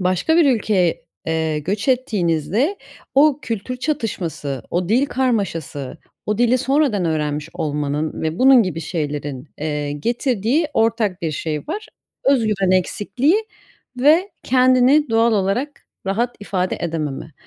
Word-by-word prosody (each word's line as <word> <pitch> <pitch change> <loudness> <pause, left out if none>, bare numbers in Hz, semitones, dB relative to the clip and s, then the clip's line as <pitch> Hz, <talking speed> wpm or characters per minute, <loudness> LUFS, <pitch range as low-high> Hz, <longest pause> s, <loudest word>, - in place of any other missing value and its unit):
başka 185 - +1
bir 340 - +6
ülkeye, 190 -5 0 0.2
eee, 160 -1 0
göç 200 - -3
ettiğinizde 220 - +1 0.4
o 285 0 +5
kültür 230 +1 -4
çatışması, 190 - -3
o 175 0 -1
dil 250 +7 +3
karmaşası, 195 - -2 0.3
o 210 0 -1
dili 245 +1 +3
sonradan 265 -7 +1
öğrenmiş 150 -2 -1
olmanın 150 0 -2
ve 160 +2 -2
bunun 260 -2 +7
gibi 170 -4 -3
şeylerin, 145 -4 -4
eee, 150 -1 -2
getirdiği 240 - 0
ortak 225 -5 +1
bir 165 - 0
şey 155 +1 -3
var. 425 +6 -4 0.4
Özgüven 215 -8 +2
eksikliği 245 - +1 0.6
ve 325 +9 +4
kendini 255 +2 +4
doğal 225 +1 +3
olarak 215 +8 -1 0.2
rahat 235 +5 -1
ifade 185 -2 -2
edememe. 160 -2 -4
200 Hz, 125 wpm, -20 LUFS, 160-255 Hz, 0.6 s, bunun